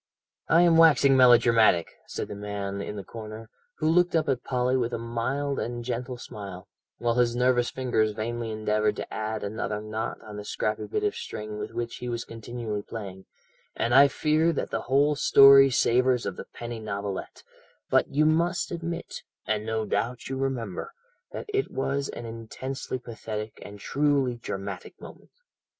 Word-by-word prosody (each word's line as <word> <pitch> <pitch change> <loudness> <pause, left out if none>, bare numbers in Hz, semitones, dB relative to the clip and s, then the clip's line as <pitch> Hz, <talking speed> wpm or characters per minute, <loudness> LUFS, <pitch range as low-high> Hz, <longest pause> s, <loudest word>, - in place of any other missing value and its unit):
"I 170 +2 +5
am 170 -2 +5
waxing 145 -4 +6
melodramatic," 115 -8 +5 0.2
said - - -4
the - - -6
man 100 -1 -4
in 105 - -5
the 100 - -6
corner, 110 +1 -9 0.2
who 155 - -1
looked 175 +2 +3
up 160 -1 +2
at 125 -2 0
Polly 125 0 0
with 120 -2 0
a - - 0
mild 125 +5 -2
and 120 0 -4
gentle 125 +1 -3
smile, 100 -6 -9 0.3
while 120 -1 0
his 120 -1 +2
nervous 125 -1 +2
fingers 120 -4 0
vainly 115 +2 -3
endeavoured 110 0 0
to - - -6
add 110 0 -3
another 105 0 -3
knot 110 +1 -4
on 105 -1 -9
the 105 - -6
scrappy 105 +1 -2
bit - - -2
of - - +1
string 105 0 -6
with - - -4
which 120 0 -3
he 125 - -5
was 120 -1 -3
continually 115 -2 -5
playing, 100 -4 -8 0.5
"and 115 +1 0
I 140 +2 +8
fear 155 +3 +2
that - - -3
the - - -1
whole 145 +3 +2
story 135 -1 +8
savours 125 0 +2
of 95 - -3
the - - -8
penny 120 -1 -7
novelette, 100 -2 -5 0.5
but - - +4
you 150 +2 +2
must 170 +3 +1
admit, 170 0 -5 0.2
and 110 +1 -1
no 110 -1 -1
doubt 120 +4 -2
you 135 - -2
remember, 130 -8 -3 0.4
that - - -6
it 405 0 0
was 140 +1 -2
an 120 - -7
intensely 115 +4 -5
pathetic 110 -3 -6
and 100 0 -10
truly 140 0 +1
dramatic 100 -4 -6
moment. - - -13
120 Hz, 170 wpm, -27 LUFS, 110-135 Hz, 0.5 s, I